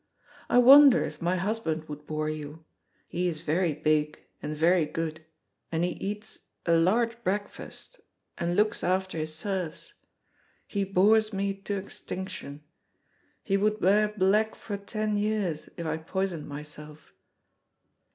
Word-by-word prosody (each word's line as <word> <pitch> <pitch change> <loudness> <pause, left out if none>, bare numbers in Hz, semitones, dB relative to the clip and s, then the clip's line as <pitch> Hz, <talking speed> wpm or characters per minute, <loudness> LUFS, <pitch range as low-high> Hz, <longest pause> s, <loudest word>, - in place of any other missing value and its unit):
I - - +3
wonder 270 +1 +9
if - - -7
my 175 +2 +1
husband 175 -5 -2
would 150 0 -9
bore 155 0 -2
you. 155 +1 -6 0.4
He 180 +1 -1
is 160 -2 -3
very 170 +1 +1
big, 150 0 +1 0.2
and 150 +1 -4
very 165 0 +3
good, 160 0 -4 0.5
and 165 0 0
he 180 - +1
eats 210 +4 -5 0.3
a 170 - +3
large 230 +8 +2
breakfast, 205 - -5 0.4
and 170 +1 -1
looks 210 +2 +1
after 185 -2 0
his 155 0 -4
serfs. 180 -1 -4 0.7
He 200 -1 -2
bores 210 +3 +3
me 195 0 -1
to 200 +1 -4
extinction. 190 -6 -7 0.8
He 195 -1 +1
would 210 +2 +1
wear 210 +3 +4
black 210 +1 +2
for 205 - -6
ten 210 +1 -2
years 205 -7 -1
if 170 - -5
I 160 0 -1
poisoned 175 0 -3
myself." 150 +1 -10
185 Hz, 140 wpm, -28 LUFS, 155-210 Hz, 0.8 s, wonder